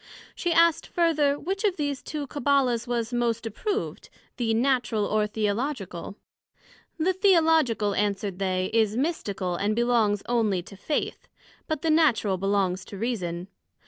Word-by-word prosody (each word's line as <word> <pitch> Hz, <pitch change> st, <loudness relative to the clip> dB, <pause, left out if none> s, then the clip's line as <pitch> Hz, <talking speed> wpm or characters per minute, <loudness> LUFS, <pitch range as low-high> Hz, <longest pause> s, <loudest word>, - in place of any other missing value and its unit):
she 350 Hz, -, -2 dB
asked 335 Hz, -1 st, +4 dB
further, 310 Hz, -5 st, +2 dB
which 385 Hz, +7 st, -3 dB
of 400 Hz, -4 st, +2 dB
these 285 Hz, -3 st, -2 dB
two 300 Hz, -2 st, -5 dB
Cabbala's 265 Hz, -4 st, +1 dB
was 240 Hz, 0 st, -2 dB
most 235 Hz, -1 st, 0 dB
approved, 405 Hz, -, -3 dB, 0.3 s
the 235 Hz, -3 st, 0 dB
Natural, 235 Hz, -2 st, +1 dB
or 210 Hz, +1 st, +1 dB
Theological? 210 Hz, -, -3 dB, 0.8 s
The 350 Hz, +3 st, +1 dB
Theological, 320 Hz, -, +3 dB
answered 200 Hz, -1 st, -1 dB
they, 185 Hz, -1 st, -1 dB
is 220 Hz, -1 st, +2 dB
mystical, 200 Hz, -, -2 dB
and 205 Hz, +4 st, 0 dB
belongs 230 Hz, -4 st, +2 dB
onely 215 Hz, -7 st, +1 dB
to 195 Hz, -, -12 dB
Faith; 290 Hz, +10 st, -3 dB, 0.4 s
but 315 Hz, -3 st, -3 dB
the 325 Hz, -, +2 dB
Natural 245 Hz, -, +3 dB
belongs 195 Hz, -1 st, 0 dB
to 200 Hz, -, -9 dB
Reason. 185 Hz, -6 st, -3 dB
235 Hz, 140 wpm, -26 LUFS, 205-295 Hz, 0.8 s, asked